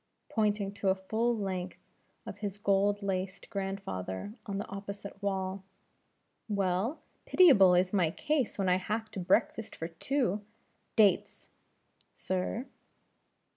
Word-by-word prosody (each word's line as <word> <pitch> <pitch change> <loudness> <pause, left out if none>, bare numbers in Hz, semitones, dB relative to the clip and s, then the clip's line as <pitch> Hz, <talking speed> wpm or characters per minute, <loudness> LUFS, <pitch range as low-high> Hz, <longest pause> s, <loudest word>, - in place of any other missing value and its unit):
pointing 210 -3 +1
to 200 -1 -4
a 190 - +4
full 225 +5 0
length 185 -2 -4 0.4
of 205 - -7
his 205 -2 -4
gold 200 0 +2
laced 190 0 -3
grandfather 195 - -4
on 200 -1 -2
the 200 - -3
opposite 200 0 -7
wall. 190 -1 -2 0.9
"Well, 200 - 0 0.2
pitiable 205 - +7
is 180 +2 +2
my 180 -5 +3
case 290 - -1
when 195 -2 0
I 180 0 +4
have 215 +3 -3
to 195 - -5
breakfast 190 +4 +1
for 165 - -5
two. 210 - 0 0.5
Dates!" 210 -3 +3 0.7
"Sir." 185 +6 -2
195 Hz, 125 wpm, -31 LUFS, 185-210 Hz, 0.9 s, pitiable